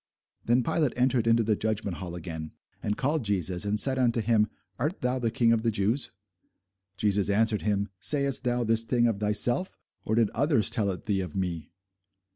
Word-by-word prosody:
Then 120 +2 +2
Pilate 150 +1 0
entered 125 -2 +2
into 115 0 +4
the 110 0 +1
judgment 105 -4 -2
hall 90 -2 -6
again, 80 -2 -7 0.3
and 105 - -2
called 145 +1 0
Jesus, 95 -3 -1
and 105 +1 0
said 130 +2 +2
unto 120 -2 +2
him, 110 -1 +2 0.3
Art 150 - -2
thou 125 +1 0
the 115 -2 0
King 115 +1 +2
of 115 -1 +2
the 115 - +1
Jews? 110 +5 0 0.9
Jesus 100 0 +1
answered 110 +1 +2
him, 100 -1 0
Sayest 140 +5 +1
thou 120 0 0
this 115 0 +2
thing 120 +1 +1
of 115 -4 0
thyself, 105 - 0 0.3
or 110 - -1
did 115 -3 +2
others 135 - +2
tell 105 -3 +2
it 90 - -5
thee 100 -3 0
of 90 -5 -6
me? 85 -5 -3
110 Hz, 190 wpm, -27 LUFS, 100-120 Hz, 0.9 s, into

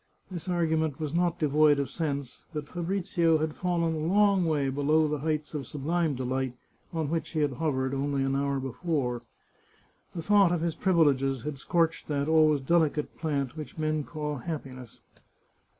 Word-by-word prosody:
This 175 -1 -6
argument 160 -4 0
was 155 -2 -3
not 175 0 +1
de 155 - +1
void 150 0 +4
of 140 -1 -2
sense, 140 -5 -4
but 150 -1 -4
Fabrizio 175 -2 +1
had 155 0 -2
fallen 170 -2 0
a 160 - -3
long 200 -1 +4
way 145 -4 +1
below 150 +3 +2
the 150 -1 -2
heights 155 +1 -2
of 140 -5 -4
sublime 155 +1 -1
delight 130 0 -2 0.3
on 160 -3 -2
which 165 -3 -1
he 155 - -1
had 145 -1 +2
hovered 130 -2 -1
only 140 0 0
an 135 0 0
hour 140 0 0
before. 135 -2 -2 0.9
The 165 - -4
thought 200 -1 +5
of 175 -2 0
his 170 -1 0
privileges 140 - +2
had 145 -2 -5
scorched 165 +2 0
that 145 -1 -1
always 155 -2 +4
delicate 155 0 +1
plant 140 -5 -1
which 155 0 -8
men 155 -1 0
call 150 -1 -4
happiness. 130 -5 -7
155 Hz, 170 wpm, -28 LUFS, 140-165 Hz, 0.9 s, thought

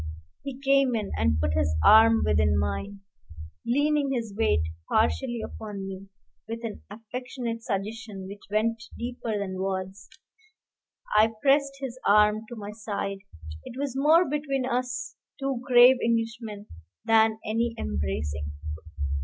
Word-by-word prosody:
He 275 -2 -7
came 275 -2 +3
in 215 -3 -2
and 75 -1 +1
put 75 0 0
his 80 0 +1
arm 225 +1 +7
within 70 -3 +3
mine, 195 - -2 0.7
leaning 285 +2 +2
his 230 -5 -3
weight 85 - +2 0.3
partially 80 - +1
upon 205 -3 -7
me, 195 0 -8 0.4
with 230 +1 -5
an 225 -2 -5
affectionate 230 +2 -5
suggestion 210 -1 -4
which 200 +1 -9
went 220 +2 0 0.2
deeper 235 -2 -3
than 190 -2 -4
words. 190 0 -4 1.1
I 220 +1 +5
pressed 280 0 +4
his 255 -2 -6
arm 210 +1 +5
to 240 - -7
my 205 -2 -7
side: 205 -2 -4 0.4
it 240 - -9
was 280 -2 -2
more 315 +6 +5
between 275 -2 -1
us 250 0 -2 0.2
two 270 -3 -2
grave 250 0 +7
Englishmen 225 -2 -2 0.4
than 220 -1 +4
any 230 +2 0
embracing. 75 +1 -3
225 Hz, 130 wpm, -27 LUFS, 195-250 Hz, 1.1 s, arm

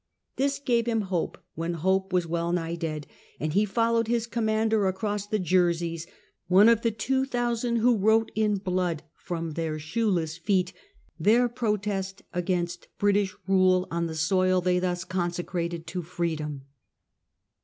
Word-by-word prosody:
This 275 +1 +1
gave 240 -5 +1
him 225 -2 +1
hope, 175 -3 -1 0.2
when 165 +2 -3
hope 190 +3 +1
was 180 -1 +2
well 170 +1 -1
nigh 170 -1 -1
dead, 155 -3 -4 0.3
and 155 0 -2
he 205 +4 +3
followed 230 +2 +1
his 235 -1 +1
commander 220 -2 +1
across 205 +1 -2
the 215 - 0
Jerseys, 170 -3 +1 0.4
one 195 +5 +7
of 230 -1 +4
the 230 - +2
two 260 +5 0
thousand 240 -2 -1
who 235 +1 +4
wrote 220 +2 +3
in 215 -1 +2
blood, 180 -4 -1
from 165 -2 -5
their 160 0 -2
shoeless 165 -1 -1
feet, 185 +1 0 0.5
their 235 +4 +4
protest 210 -5 -2
against 175 -1 -2
British 205 -1 +2
rale 185 -1 +3
on 170 0 -1
the 160 - -5
soil 185 +3 +2
they 180 0 +2
thus 180 -1 -1
consecrated 175 -2 -3
to 175 +2 -4
Freedom. 160 -5 -3
185 Hz, 150 wpm, -27 LUFS, 170-220 Hz, 0.5 s, one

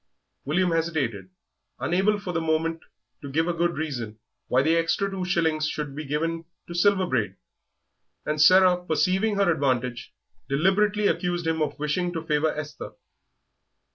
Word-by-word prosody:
William 175 +5 +1
hesitated, 150 - -1 0.5
unable 195 +4 +1
for 185 -3 -5
the 165 - 0
moment 160 +1 0 0.4
to 140 - -7
give 160 +4 0
a 175 - 0
good 170 +1 0
reason 120 -9 -4 0.3
why 130 +2 +3
the 160 +3 +3
extra 165 +4 0
two 190 -1 -4
shillings 160 -4 +1
should 145 -2 -5
be 155 - -5
given 165 +3 -2 0.2
to 170 - -7
Silver 190 +2 +3
Braid; 110 - -1 0.9
and 150 0 0
Sarah, 185 +1 +6
perceiving 185 +6 +1
her 200 -3 +3
advantage, 125 -5 -1 0.4
deliberately 200 +8 +2
accused 175 -3 0
him 160 -1 0
of 150 -2 -1
wishing 150 +4 -1
to 165 -2 -4
favour 150 0 +1
Esther. 150 0 -7
165 Hz, 150 wpm, -25 LUFS, 150-180 Hz, 0.9 s, Sarah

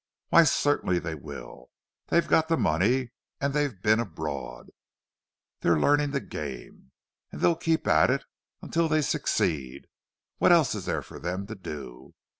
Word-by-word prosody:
"Why, 170 - +7
certainly 145 - +1
they 80 -1 -3
will. 60 -3 -10 0.4
They've 170 - +2
got 160 0 +3
the 165 0 +1
money; 120 - +1 0.3
and 140 0 -1
they've 145 -8 -1
been 110 +1 +4
abroad—they're 80 - -5
learning 145 - +3
the 140 0 -1
game. 70 - -8 0.4
And - - -8
they'll 170 - +3
keep 165 0 0
at 80 0 +4
it - - 0 0.4
until 165 0 0
they 155 -1 +2
succeed—what 70 - -2
else - - +5
is - - -5
there - - -2
for - - -11
them 90 +3 -3
to 110 - -7
do? 75 - -9
100 Hz, 145 wpm, -27 LUFS, -, 0.4 s, Why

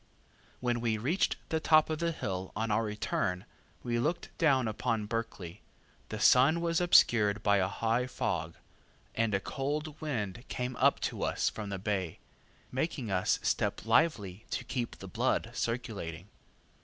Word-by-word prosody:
When 120 -1 0
we 115 -2 +1
reached 145 - +1
the 160 - +1
top 155 0 +5
of 155 - -2
the 170 0 +1
hill 95 - -4
on 110 +1 -1
our 105 +2 +2
return, 105 -4 -2 0.4
and 120 -1 0
looked 170 +3 -2
down 135 -7 +3
upon 110 0 -1
Berkeley, 105 -5 -5 0.5
the - - -4
sun 140 +6 +6
was 170 0 +1
obscured 110 - +5
by 100 -1 +4
a 95 -1 +2
high 115 +5 0
fog, 85 -9 -2 0.6
and 115 -2 +1
a - - +2
cold 150 +7 -3
wind 115 -8 -3
came 125 0 -3
up - - +4
to - - -2
us - - +1
from 105 -2 -6
the 100 - -3
bay, 95 -4 -2 0.5
making 130 -4 -2
us 95 -1 +2
step - - 0
lively 105 - +2
to - - -2
keep 125 -1 -3
the - - -9
blood - - 0
circulating. 100 -7 -4
115 Hz, 155 wpm, -31 LUFS, 100-135 Hz, 0.6 s, sun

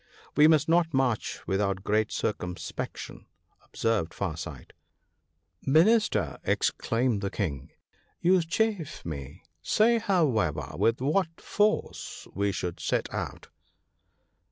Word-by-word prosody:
"We 150 +1 +7
must 155 0 +4
not 165 -2 +3
march 130 -4 0
without 95 -1 0
great 105 +1 +1
circumspection," 90 -4 -4 0.4
observed 110 -8 -1
Far 90 -6 -2
sight. 80 -6 -8 0.5
" - - -49 0.2
Minister! 170 - +3
" - - -41
exclaimed 115 -2 0
the 100 - -1
King, 75 - -3 0.2
" - - -38
you 180 +1 +4
chafe 175 0 -1
me. 70 -4 -7 0.2
Say, 230 +2 +3
however, 115 - +1
with 115 +8 +1
what 165 +4 0
force 210 0 -1
we 100 +1 0
should 90 -2 -4
set - - -1
out." - - -5
115 Hz, 120 wpm, -28 LUFS, -, 0.5 s, We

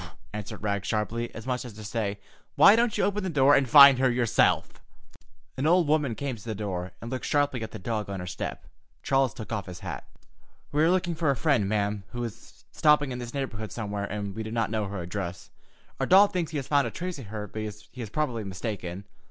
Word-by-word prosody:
"Bow - - -8
wow!" - - -16 0.2
answered 105 0 -6
Rags 100 -1 -1
sharply, 115 +2 -2
as 115 - -8
much 125 0 -2
as 120 -3 -9
to 110 +1 -10
say, 105 -1 -3 0.4
"Why 205 - +8
don't 235 -1 +1
you - - +1
open 205 +1 0
the 190 - -2
door 145 -3 +4
and 135 -3 +3
find 140 -2 +9
her 130 0 +4
yourself?" 120 -2 +1 0.8
An 135 +4 0
old 175 -1 +4
woman 145 -6 +1
came 140 -1 -3
to 105 - -14
the 110 -2 -4
door, 95 -3 -4
and 115 - -7
looked 130 -1 -4
sharply 145 -4 +1
at 110 - -4
the - - -8
dog 105 +1 -3
on 100 -1 -4
her 90 - -5
clean 90 - -5
step. - - -5 0.4
Charles 135 -2 +2
took 110 -3 -9
off 105 -4 -3
his 90 -1 -9
hat. - - -6 0.6
"We 150 - +1
are 160 - +5
looking 180 -1 +1
for 160 -2 0
a 140 - +3
friend, 120 -5 +1
madam, 105 -1 0
who 120 0 -3
is 115 -4 -9
stopping 150 -2 +3
in 125 - -4
this 120 +2 -7
neighborhood 110 -6 -4
somewhere, 105 -3 -3
and 100 -1 -4
we 110 - -4
do 110 - -5
not 115 -1 -1
know 110 -1 -1
her 95 -2 -5
address. 90 -1 -5 0.5
Our - - 0
dog 200 +2 +6
thinks 175 -3 -1
he 155 - -4
has 135 - -4
found 140 -4 +3
a - - -2
trace 175 +5 -5
of 120 - -9
her, 105 0 -5
but 110 +2 -6
he 105 +3 -8
is 110 - -5
probably 120 -3 -2
mistaken. 95 -2 -5
115 Hz, 240 wpm, -27 LUFS, 105-140 Hz, 0.8 s, find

